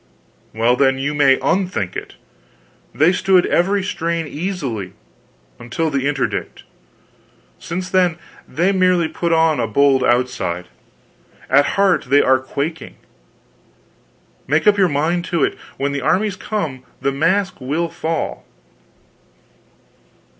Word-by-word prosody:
"Well, 115 +2 +2
then, 135 0 +2
you 140 +2 -2
may 140 -2 +4
unthink 180 - -1
it. - - -7 0.8
They 155 +4 +3
stood 185 -1 +3
every 195 +3 +1
strain 170 -3 -2
easily 140 - -4 0.7
until 155 +7 -2
the 140 -1 0
Interdict. 140 -2 -3 1.0
Since 180 +2 -5
then, 180 -3 +2 0.3
they 175 +8 +1
merely 185 -3 +2
put 170 +1 -3
on 160 -2 +3
a - - 0
bold 140 -2 +3
outside 120 - 0 0.8
at 140 +2 +5
heart 195 -5 +3
they 140 +2 +4
are 130 0 +4
quaking. 145 +5 -5 1.5
Make 150 +4 +1
up 210 -1 +5
your 195 -3 +3
mind 160 +5 0
to 170 -5 0
it - - 0 0.2
when 140 +1 -1
the 140 0 -3
armies 200 +6 +1
come, 165 -11 -4 0.2
the 140 - 0
mask 185 +8 0
will 155 +6 -1
fall." 165 0 -3
160 Hz, 125 wpm, -19 LUFS, 135-180 Hz, 1.5 s, at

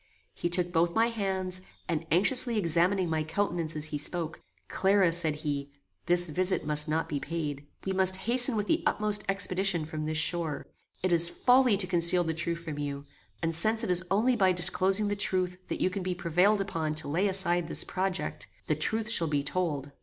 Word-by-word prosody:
He 175 - -3
took 175 0 -1
both 170 +1 +1
my 230 +1 +2
hands, 190 -4 -4 0.3
and 165 -1 -3
anxiously 230 - +4
examining 180 +1 +1
my 160 -1 -1
countenance 165 -1 -3
as 150 0 +1
he 145 - -2
spoke, 160 +1 -4 0.3
"Clara," 195 -2 +2
said 165 -3 +1
he, 140 -1 -3 0.4
"this 175 0 +3
visit 180 +2 0
must 150 0 +4
not 160 +1 -1
be 145 - -4
paid. 145 -4 -5 0.2
We 190 - -2
must 190 0 +3
hasten 245 +1 +7
with 210 -1 -2
the 325 +8 0
utmost 210 -6 -1
expedition 190 -3 0
from 155 0 -6
this 155 0 -3
shore. 160 -1 -2 0.4
It 185 -1 +1
is 170 0 +6
folly 250 0 +3
to 190 - +2
conceal 175 0 +2
the 160 -1 -2
truth 170 +1 -4
from 155 -3 -7
you, 140 -1 -5 0.4
and, 165 - -1
since 220 +8 +2
it 195 - -1
is 180 0 +4
only 230 +6 +2
by 190 -5 +2
disclosing 185 +3 +3
the 205 - -2
truth 185 -2 -2
that - - -5
you 185 - +1
can 195 - -5
be 180 0 -3
prevailed 180 +4 +1
upon 160 -5 -3
to 155 - -2
lay 175 +8 0
aside 175 -3 0
this - - -2
project, 190 0 -4 0.2
the - - 0
truth 220 0 -1
shall 170 -7 0
be 145 -2 -1
told. 145 -3 -3
180 Hz, 200 wpm, -28 LUFS, 160-195 Hz, 0.4 s, hasten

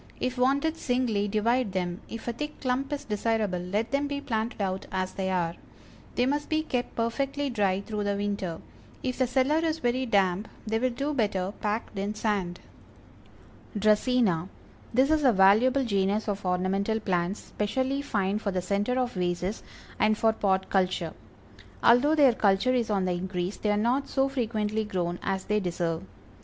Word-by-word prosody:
If 255 0 -1
wanted 280 +5 +2
singly, 245 -7 0
divide 220 +1 +1
them, 180 +1 -2
if 230 +1 -7
a 235 - 0
thick 295 +6 -6
clump 260 +1 -1
is 290 -1 -3
desirable 210 -3 0
let 200 +6 -2
them 280 +1 +1
be 285 0 -3
planted 225 -4 -2
out 190 -1 -2
as 185 0 -1
they 190 -1 -2
are. 175 -3 0 0.6
They 245 - +3
must 290 +2 -1
be 310 0 +1
kept 250 -5 -3
perfectly 275 +4 -1
dry 195 -4 +1
through 210 0 -4
the 200 0 0
winter; 200 -4 -3 0.4
if 255 0 -2
the 255 - +3
cellar 265 +5 +2
is 325 -1 0
very 255 -1 0
damp 195 -1 +2 0.2
they 220 +1 0
will 255 +2 +2
do 275 +5 -2
better 200 -6 0
packed 210 -1 -2
in 205 +2 -2
sand. 200 -5 -1 1.2
DRACÆNA. 210 -4 +2 0.4
This 260 +5 +3
is 310 -1 +3
a 260 - +6
valuable 220 +7 +5
genus 200 0 +1
of 200 -2 -2
ornamental 195 +4 0
plants, 185 -1 -1
specially 260 +6 -1
fine 205 -6 0
for 210 - -2
the 185 -2 -1
center 205 +6 0
of 250 -1 -1
vases, 180 +2 -2 0.4
and 215 0 +3
for 225 0 +3
pot 190 -3 0
culture. 185 -4 +1 0.7
Although 270 +6 +5
their 280 -5 +6
culture 205 +4 +2
is 240 -3 +1
on 195 -3 +1
the 185 - 0
increase, 180 +1 -3
they 210 - -1
are 205 - +2
not 245 +6 +1
so 270 0 +1
frequently 220 -5 -1
grown 175 -4 -2
as 190 -1 -2
they 210 0 +1
deserve. 170 -3 -2
215 Hz, 175 wpm, -27 LUFS, 190-255 Hz, 1.2 s, a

